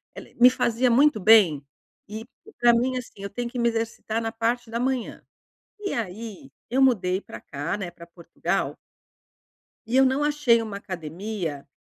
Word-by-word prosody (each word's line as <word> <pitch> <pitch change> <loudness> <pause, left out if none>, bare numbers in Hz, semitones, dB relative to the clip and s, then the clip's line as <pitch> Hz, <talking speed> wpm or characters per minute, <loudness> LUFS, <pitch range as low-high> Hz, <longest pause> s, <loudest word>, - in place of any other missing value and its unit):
ela - - -9
me 250 - +9
fazia 250 -1 +1
muito 270 0 +4
bem. 190 -9 +5 0.4
E 220 +2 -7 0.3
pra 240 0 +6
mim, 255 +2 +1
assim, 250 - -7
eu 200 - -5
tenho 240 +4 -4
que 245 0 -5
me 235 - +3
exercitar 225 -1 -3
na 225 0 -2
parte 230 +1 -2
da 235 - -2
manhã. 255 -2 -2 0.6
E 400 -1 -4
aí 210 - -5 0.2
eu 265 +2 +2
mudei 190 -7 +2
pra 110 - -11
cá, 145 +6 -4
né, 185 -4 -5
pra 170 - -13
Portugal 170 -1 -3 1.1
e 230 +3 -2
eu 265 - +6
não 265 +3 +1
achei 295 -6 +3
uma 215 -3 -5
academia. 175 -4 -5
225 Hz, 170 wpm, -25 LUFS, 190-245 Hz, 1.1 s, me